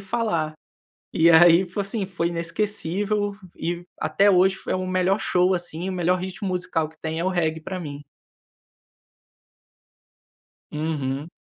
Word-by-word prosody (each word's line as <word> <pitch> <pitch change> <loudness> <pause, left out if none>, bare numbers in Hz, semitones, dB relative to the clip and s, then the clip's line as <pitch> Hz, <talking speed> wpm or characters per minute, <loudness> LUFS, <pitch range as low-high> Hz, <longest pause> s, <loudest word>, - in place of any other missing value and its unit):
falar, 190 -7 -1 0.6
e 165 +1 +5
aí 170 +2 +7
foi, 205 - -4
assim, 200 +1 -2
foi 170 -3 -1
inesquecível, 205 +3 -1 0.2
e 175 +1 -3 0.2
até 175 +6 +3
hoje 190 +1 +4
foi - - -4
o 185 0 -2
melhor 185 +2 +1
show, 180 -3 +2
assim, 175 0 -3
o - - -2
melhor 180 0 +1
ritmo 190 +2 -5
musical 175 -3 -1
que 160 - -20
tem 160 0 -3
é - - -1
o 185 - +2
reggae 160 -3 0
para 185 +3 -5
mim. 145 -3 -7 2.7
Uhum. 150 -1 -3
180 Hz, 140 wpm, -24 LUFS, 160-190 Hz, 2.7 s, aí